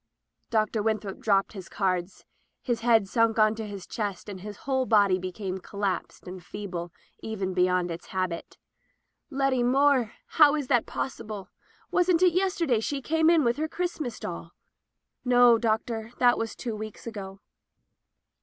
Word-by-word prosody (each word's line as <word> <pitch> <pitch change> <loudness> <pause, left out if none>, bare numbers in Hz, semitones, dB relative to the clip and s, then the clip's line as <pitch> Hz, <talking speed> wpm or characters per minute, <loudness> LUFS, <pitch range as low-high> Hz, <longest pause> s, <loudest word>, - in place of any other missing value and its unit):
Dr. 215 -1 +1
Winthrop 215 -2 -2
dropped 200 -1 +2
his 190 -3 -9
cards. 185 -2 -2 0.4
His 240 -3 -1
head 225 -3 +3
sunk 230 +1 +2
on 215 0 +4
his 205 -4 -6
chest, 205 -4 -4
his 205 +1 -7
whole 265 -2 0
body 200 -4 +4
became 185 +1 -4
collapsed 200 0 -4
and 180 0 -8
feeble 175 -3 -6 0.3
even 195 -4 -3
beyond 180 -1 +2
its 165 - -7
habit. 185 -3 -3 0.7
"Letty 270 -3 +1
Moore! 260 -2 +3
How 300 -2 +5
is 290 -4 -3
that 245 -4 +3
possible? 210 -7 -5 0.4
Wasn't 360 -1 +3
it 360 -2 +5
yesterday 350 - +1
she 275 +5 -2
came 320 +4 +2
in 335 -3 +5
with 235 +1 +1
her 310 +1 -1
Christmas 315 -8 -4
doll?" - - -7 0.7
"No, 245 -2 +6
Doctor, 225 0 -1
that 245 -1 +5
was 225 -1 -3
two 235 -4 -4
weeks 215 0 -8
ago.' 195 -4 -7
220 Hz, 145 wpm, -27 LUFS, 195-255 Hz, 0.7 s, No